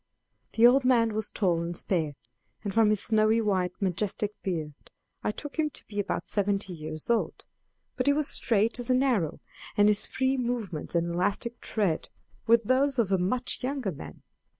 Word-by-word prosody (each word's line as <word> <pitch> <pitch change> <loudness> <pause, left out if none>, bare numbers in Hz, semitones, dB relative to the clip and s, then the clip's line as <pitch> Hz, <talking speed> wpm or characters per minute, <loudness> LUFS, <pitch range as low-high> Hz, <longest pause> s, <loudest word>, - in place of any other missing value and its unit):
The 230 - +5
old 255 +3 +6
man 235 -3 +3
was 215 -1 -2
tall 175 -5 0
and 170 0 -4
spare, 160 -7 0 0.5
and 200 -3 -3
from 225 0 +4
his 210 -1 +2
snowy 220 0 +3
white 185 -5 0
majestic 205 +2 -1
beard 160 -5 -3 0.5
I - - 0
took 290 +8 -6
him 305 -1 +2
to - - -8
be 205 -1 -6
about 200 - -2
seventy 200 -2 0
years 155 -1 -6
old; 230 - -1 0.5
but - - -1
he 285 - +6
was 295 0 0
straight 225 +1 +1
as 245 - +2
an 255 +1 +3
arrow, 205 - 0 0.4
and 205 0 +6
his 210 0 +2
free 265 +1 0
movements 235 - -3
and 170 0 +1
elastic 205 +7 -1
tread 195 -8 -1 0.4
were 230 +1 +7
those 260 +4 +1
of 220 -5 +1
a 190 - +3
much 240 +8 -1
younger 260 -5 -2
man. 145 - -10
210 Hz, 180 wpm, -28 LUFS, 185-245 Hz, 0.5 s, were